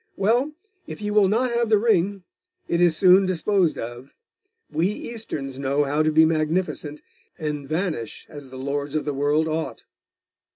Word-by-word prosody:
Well, 240 +9 +1 0.3
if - - -7
you 210 0 -3
will 210 -2 +5
not 240 +5 +1
have 235 -1 0
the 215 - +5
ring, 200 -3 +1 0.4
it 170 0 +1
is 170 -3 +4
soon 185 0 +6
disposed 185 -1 +1
of. 120 +4 -8 0.6
We 160 +4 +1
Easterns 195 - -5
know 140 +1 +1
how 145 +2 0
to 155 0 +2
be 160 +1 +6
magnificent, 155 -1 -1 0.3
and 150 -3 -4
vanish 160 - -3
as 145 -3 -10
the 130 - -10
lords 140 +2 -3
of 155 - -1
the 145 - -1
world 145 +3 +1
ought. 160 0 -3
160 Hz, 165 wpm, -23 LUFS, 145-200 Hz, 0.6 s, soon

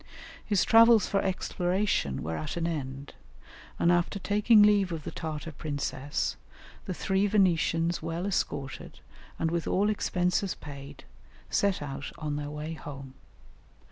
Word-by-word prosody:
His 205 -3 +2
travels 230 -2 +6
for 195 - +1
exploration 185 - -1
were 80 +1 -3
at 150 - -4
an 165 - -1
end, 140 -4 -4 0.6
and 170 - +3
after 175 +2 +1
taking 210 +2 +4
leave 205 -3 +4
of 160 -2 -4
the - - -5
Tartar 160 -1 -5
princess, 145 -1 -3 0.5
the 185 - -3
three 195 +2 +1
Venetians 170 -4 +2
well 165 +3 -3
escorted, 145 -8 -3 0.4
and 160 0 0
with 170 -1 -1
all 205 +3 +2
expenses 180 -1 0
paid, 140 -2 -10 0.5
set 200 -6 +1
out 135 -1 -6
on 150 -2 -3
their 145 0 -4
way 150 +2 -5
home. 140 -4 -9
170 Hz, 140 wpm, -28 LUFS, 145-195 Hz, 0.6 s, travels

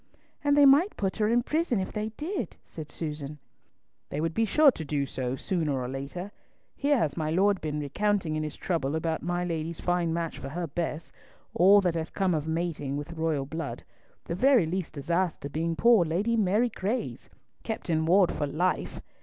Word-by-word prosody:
"And 290 0 +3
they 290 - +8
might 295 +9 +5
put 195 -2 -1
her 210 -1 +2
in 240 +2 +3
prison 305 - 0
if 185 - -3
they 215 0 -2
did," 310 - -4
said 155 -2 -9
Susan. 150 -2 -5 0.7
"They 145 - -3
would 165 +1 -1
be 225 - +2
sure 290 +7 +6
to 165 - -7
do 145 -1 -1
so, 130 -1 -3
sooner 155 -3 -1
or 125 - -3
later. 140 +9 -5 0.4
Here 285 0 +2
has 155 - 0
my 155 -2 -2
lord 195 +4 +2
been 150 -1 -2
recounting 175 +3 0
in 155 - -1
his 155 -1 -4
trouble 160 -5 -1
about 160 0 -1
my 175 +1 -1
lady's 165 -1 -3
fine 175 -2 0
match 165 0 -3
for 135 - -6
her 170 +4 -3
Bess, 165 0 -4 0.4
all 195 +4 +6
that 180 -3 +1
hath 165 -1 -4
come 190 -2 +1
of 155 -1 -1
mating 160 -4 -2
with 145 +3 -6
royal 160 -4 -1
blood, 160 +1 -5 0.4
the - - -3
very 250 +1 +4
least 180 +2 -3
disaster 170 0 -1
being 165 +3 -1
poor 230 0 +5
Lady 190 +8 0
Mary 215 +3 +2
Grey's! 215 +3 -3 0.3
Kept 225 - -5
in 160 -2 +1
ward 185 +1 +5
for 145 - -2
life! 175 +6 -1
170 Hz, 195 wpm, -28 LUFS, 155-205 Hz, 0.7 s, they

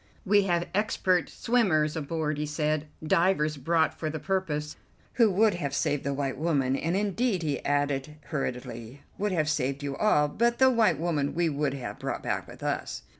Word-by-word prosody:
"We 205 0 +4
have 175 -2 +1
expert 185 -3 +1
swimmers 175 -11 +1
aboard," 155 -1 -2
he 150 - -2
said, 150 0 -1 0.2
"divers 155 -2 +2
brought 160 +4 +1
for 155 - -4
the 155 - -4
purpose, 155 -5 -2 0.4
who 230 -3 +4
would 205 +2 +3
have 145 -5 -3
saved 145 0 0
the 140 - -1
white 135 -1 -2
woman, 140 -5 +1
and 165 +6 -1
indeed," 205 -1 0
he 150 -3 -2
added 145 0 0
hurriedly, 125 -3 -5 0.2
"would 205 0 0
have 155 -4 +1
saved 140 -1 -1
you 140 -1 -3
all, 150 -7 +3
but 235 +10 +1
the 260 0 +6
white 225 - +3
woman 150 -4 -1
we 170 -1 +2
would 145 -2 -1
have 130 -3 -6
brought - - -4
back - - -2
with - - -12
us." - - -3
155 Hz, 180 wpm, -28 LUFS, 145-185 Hz, 0.4 s, the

